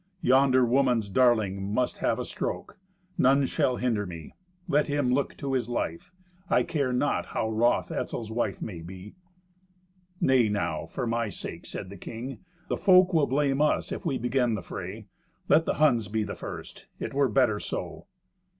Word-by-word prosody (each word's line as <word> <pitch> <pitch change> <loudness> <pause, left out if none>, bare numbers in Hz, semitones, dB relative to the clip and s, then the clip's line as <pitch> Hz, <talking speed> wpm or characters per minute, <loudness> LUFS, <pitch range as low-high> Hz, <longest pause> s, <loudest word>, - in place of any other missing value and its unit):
Yonder 130 0 +5
woman's 120 -4 +2
darling 110 -5 +3
must 105 +6 -1
have - - +1
a - - -3
stroke. - - -5 0.4
None 135 +2 +4
shall 125 -1 +1
hinder 115 -6 -1
me. 85 -3 -9 0.3
Let 150 -3 +2
him 145 -3 +1
look 140 +1 -1
to 135 -1 -3
his 125 -3 0
life. 85 - -3 0.4
I - - +4
care 140 -6 -1
not 135 +3 0
how 110 - -2
wroth 115 +2 +2
Etzel's 110 -2 -4
wife 120 +1 -2
may 90 -6 -6
be." 95 +4 -10 1.1
"Nay 130 - +4
now, 80 -6 -2
for 125 - -4
my 115 -1 -1
sake," - - -8
said 95 - -7
the 100 - -9
king. 120 +8 -7 0.3
"The - - -1
folk 185 -1 +5
will 155 -4 +3
blame 140 +1 +1
us 150 - +1
if - - -4
we 150 -7 0
begin 125 -1 +1
the 95 - -5
fray. - - -7 0.4
Let 160 - +4
the - - 0
Huns 125 -8 +3
be 110 +2 -1
the - - -5
first. - - -8
It - - -4
were 140 -1 +2
better 110 -2 +2
so." - - -5
125 Hz, 175 wpm, -27 LUFS, 105-135 Hz, 1.1 s, Yonder